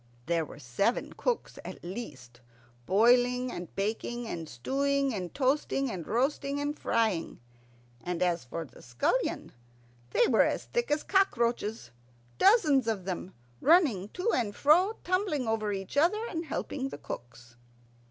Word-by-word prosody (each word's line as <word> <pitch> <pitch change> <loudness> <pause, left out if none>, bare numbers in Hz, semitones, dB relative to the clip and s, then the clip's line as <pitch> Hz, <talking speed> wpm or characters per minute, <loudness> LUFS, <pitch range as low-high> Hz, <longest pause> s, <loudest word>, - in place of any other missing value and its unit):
There 170 +1 +1
were 140 - -12
seven 145 - -1
cooks - - -2
at - - -9
least, 140 - -8 0.5
boiling 245 +5 +4
and 175 -2 -6
baking, 225 +4 -2
and 165 -6 -5
stewing 275 - 0
and 180 -5 -4
toasting, 270 -1 0
and 175 -5 -6
roasting 275 +4 0
and 290 +1 -2
frying. 220 - 0 0.6
And 180 0 -1
as 175 -3 +1
for 165 +6 -5
scullions, 125 - -1 0.6
they - - +3
were - - +4
as - - +1
thick 480 0 -2
as 295 +1 +1
cockroaches, 235 - +1 0.5
dozens 310 - +5
of 205 -5 -1
them, 185 0 -5 0.2
running 280 - +4
to 370 +6 0
and 210 -5 0
fro, 350 - +4
tumbling 365 - 0
over 215 -1 0
each 195 +2 -5
other, 365 +10 +3
and 330 0 -3
helping 270 -2 -3
the - - -7
cooks. 120 -3 -9
235 Hz, 140 wpm, -29 LUFS, 180-290 Hz, 0.6 s, dozens